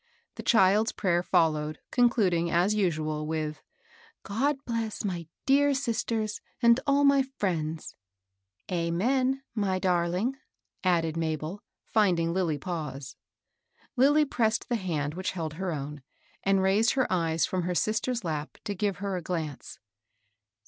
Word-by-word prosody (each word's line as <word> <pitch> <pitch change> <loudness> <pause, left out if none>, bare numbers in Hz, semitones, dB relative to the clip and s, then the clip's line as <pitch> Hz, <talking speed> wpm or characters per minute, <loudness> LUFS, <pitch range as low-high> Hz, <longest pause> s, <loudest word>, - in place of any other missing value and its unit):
The - - -7
child's 210 0 +4
prayer 175 -3 +1
followed, 155 -4 +1
concluding, 205 -9 +3
as 175 +5 +2
usual, 155 -6 -1
with, 155 -1 -2
*^ - - -25 0.6
God 270 +8 0
bless 225 -3 -3
my 175 -5 -3 0.2
dear 280 +1 +4
sisters 230 -4 -2 0.2
and 235 0 +5
all 280 0 +4
my 280 -1 +5
friends." 170 - -3 0.4
" 95 0 -51
4.7»ew, 240 +11 +1
my 200 -4 0
darling," 180 +7 0 0.5
added 165 -3 +2
Mabel, 160 +3 -3 0.2
finding 175 -6 +2
Lilly 175 -5 0
pause. 145 -4 -5 0.8
Lilly 290 +4 +5
pressed 230 -5 0
the 240 - +1
hsmd 155 -7 -2
which 185 +3 -3
held 160 -4 -4
her 185 +3 -3
own, 150 -1 -5 0.4
and 195 -1 +2
raised 205 +5 +3
her 260 -2 +2
eyes 165 -2 +1
fi'om 180 -2 -2
her 180 0 -1
sister's 220 +4 0
lap 155 -3 -4
to 205 - -3
give 200 -1 -1
her 195 -2 -1
a - - -4
glance. 160 -4 -5
185 Hz, 140 wpm, -28 LUFS, 160-225 Hz, 0.8 s, and